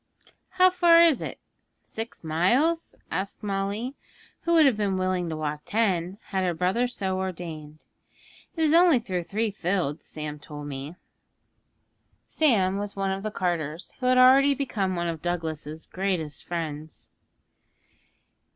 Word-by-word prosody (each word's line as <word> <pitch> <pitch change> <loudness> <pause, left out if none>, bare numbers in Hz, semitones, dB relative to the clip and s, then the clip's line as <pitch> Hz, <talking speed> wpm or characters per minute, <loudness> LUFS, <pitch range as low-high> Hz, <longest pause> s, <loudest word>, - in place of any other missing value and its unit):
'How 370 0 +5
far 345 -2 +6
is 325 -6 +4
it? - - -6 0.4
Six 225 -2 -7
miles?' 240 - +1 0.2
asked 195 +5 -4
Molly, 200 +5 -2 0.5
who 340 - 0
would 320 -2 +6
have 265 -5 +4
been 200 -3 0
willing 185 -2 -1
to 160 - -4
walk 150 -1 -3
ten, 190 -4 0
had 190 -2 0
her 175 -2 0
brother 185 +9 +1
so 190 -6 -3
ordained. 160 -5 -6 0.7
'It 325 - 0
is 310 -1 +3
only 340 -3 +6
through 190 -7 -3
three 215 +3 -1
fields, 175 -6 -2
Sam 150 -1 -6
told 145 0 -9
me.' 140 +3 -6 1.3
Sam 200 -11 +2
was 205 0 -5
one 195 -1 -1
of 190 0 -3
the 215 - -3
carters, 170 -4 -3
who 250 - -1
had 255 0 +4
already 270 +2 +6
become 205 -9 -1
one 175 0 -1
of 165 -2 -4
Douglas's 160 -3 -4
greatest 180 -6 -3
friends. 155 -3 -6
190 Hz, 145 wpm, -26 LUFS, 165-235 Hz, 1.3 s, far